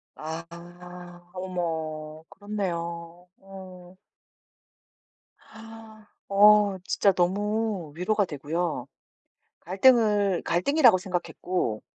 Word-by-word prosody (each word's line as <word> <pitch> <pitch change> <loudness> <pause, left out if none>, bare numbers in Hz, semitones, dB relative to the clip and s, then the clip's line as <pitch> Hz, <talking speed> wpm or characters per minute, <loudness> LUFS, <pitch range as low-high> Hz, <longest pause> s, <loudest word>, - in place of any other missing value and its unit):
아. 160 +2 -6 0.9
어머. 160 -4 -5
그렇네요. 175 -4 -5
어. 185 -2 -13 2.3
어. 205 0 +5
진짜 200 - +2
너무 200 -1 -1
위로가 205 +3 0
되고요. 150 -2 -3 0.7
갈등을 205 -1 +3
갈등이라고 240 - +4
생각했고 180 - -3
185 Hz, 155 characters per minute, -26 LUFS, 170-205 Hz, 2.3 s, 어